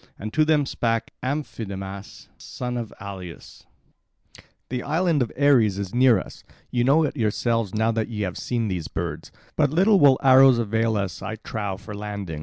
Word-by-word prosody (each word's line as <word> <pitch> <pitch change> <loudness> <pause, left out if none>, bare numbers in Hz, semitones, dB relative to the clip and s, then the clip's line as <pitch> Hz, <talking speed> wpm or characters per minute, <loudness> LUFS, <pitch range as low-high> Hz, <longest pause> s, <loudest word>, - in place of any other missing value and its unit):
And 110 +1 -7
to 155 - +4
them 155 -2 +2
spake 115 -3 -2
Amphidamas, 100 -8 -5
son 125 0 -6
of 115 -3 -4
Aleus: 95 -4 -10 1.0
"The 125 0 -3
island 160 +1 +1
of 120 - -1
Ares 120 -9 +4
is 100 -2 -5
near 125 -2 +5
us; - - -10 0.3
you 120 -1 +1
know 145 +6 +4
it 150 - -2
yourselves 115 -2 -1
now 110 +1 +2
that 110 -1 -1
ye 110 -3 -5
have 90 -2 -3
seen 120 -2 -2
these 90 -5 -3
birds. 85 -3 -5 0.2
But 150 -2 +3
little 190 +7 +4
will 140 -4 +6
arrows 130 -1 +7
avail 115 0 0
us, 95 -4 -3
I 110 - -4
trow, 105 -3 -5
for 105 +3 -10
landing. 100 -6 -5
115 Hz, 175 wpm, -24 LUFS, 100-130 Hz, 1.0 s, arrows